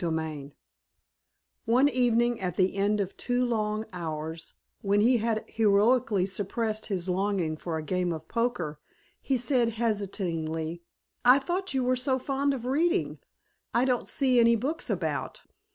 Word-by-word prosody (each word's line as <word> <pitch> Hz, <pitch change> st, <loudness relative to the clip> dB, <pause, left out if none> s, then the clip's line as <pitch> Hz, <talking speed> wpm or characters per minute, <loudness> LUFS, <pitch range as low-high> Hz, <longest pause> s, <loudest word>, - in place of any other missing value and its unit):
XXVI 160 Hz, -4 st, -3 dB, 1.1 s
One 255 Hz, +5 st, +4 dB
evening 240 Hz, -3 st, +2 dB
at 180 Hz, -2 st, -3 dB
the 185 Hz, 0 st, +2 dB
end 205 Hz, +1 st, +1 dB
of 195 Hz, -1 st, -2 dB
two 245 Hz, 0 st, 0 dB
long 215 Hz, -2 st, -1 dB
hours, 160 Hz, -1 st, -5 dB, 0.3 s
when 200 Hz, 0 st, +2 dB
he 245 Hz, +3 st, +4 dB
had 220 Hz, -1 st, -1 dB
heroically 215 Hz, -1 st, +3 dB
suppressed 215 Hz, +3 st, -3 dB
his 190 Hz, -3 st, -2 dB
longing 185 Hz, -3 st, 0 dB
for 160 Hz, +1 st, -4 dB
a 155 Hz, -, -4 dB
game 180 Hz, +2 st, -1 dB
of 160 Hz, -2 st, -6 dB
poker, 230 Hz, -11 st, -2 dB, 0.4 s
he 270 Hz, -, 0 dB
said 240 Hz, -2 st, +1 dB
hesitatingly, 175 Hz, -7 st, -2 dB, 0.4 s
"I 250 Hz, +2 st, +7 dB
thought 355 Hz, +3 st, -3 dB
you 260 Hz, -, +1 dB
were 255 Hz, +1 st, +2 dB
so 260 Hz, +1 st, 0 dB
fond 275 Hz, +1 st, 0 dB
of 245 Hz, -2 st, -7 dB
reading. 335 Hz, +8 st, +1 dB, 0.6 s
I 240 Hz, +2 st, +4 dB
don't 250 Hz, -2 st, 0 dB
see 255 Hz, -3 st, +3 dB
any 235 Hz, 0 st, +5 dB
books 275 Hz, +8 st, -2 dB
about. -, -, -3 dB
215 Hz, 150 wpm, -28 LUFS, 180-250 Hz, 1.1 s, I